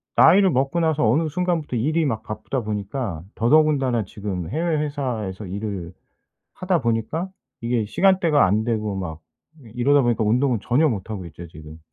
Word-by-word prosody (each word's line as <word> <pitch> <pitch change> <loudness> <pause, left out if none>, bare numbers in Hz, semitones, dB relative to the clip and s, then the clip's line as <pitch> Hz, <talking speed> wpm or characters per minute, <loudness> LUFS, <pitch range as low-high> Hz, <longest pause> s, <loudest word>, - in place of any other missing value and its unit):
나이를 190 +3 +6
먹고 135 +4 0
나서 160 -6 +2
어느 155 +6 +2
순간부터 170 -4 -1
일이 155 +7 +1
막 110 -5 -2
바쁘다 110 +4 -4
보니까 105 - -4
더더군다나 135 -3 +3
지금 95 -4 -5
해외 160 +4 0
회사에서 125 -10 -3
일을 95 -2 -5 0.6
하다 180 -3 0
보니까 115 - -1 0.3
이게 115 -2 0
시간대가 170 - +3
안 105 +4 +1
되고 110 -3 -2
막 80 -4 -5 0.4
이 115 - -14
이러다 140 +3 +3
보니까 120 -2 +1
운동은 120 +1 +2
전혀 140 +8 +2
못 105 -2 -4
하고 100 -4 -5
있죠 85 +2 -10
지금. 80 0 -12
120 Hz, 355 characters per minute, -22 LUFS, 105-150 Hz, 0.6 s, 나이를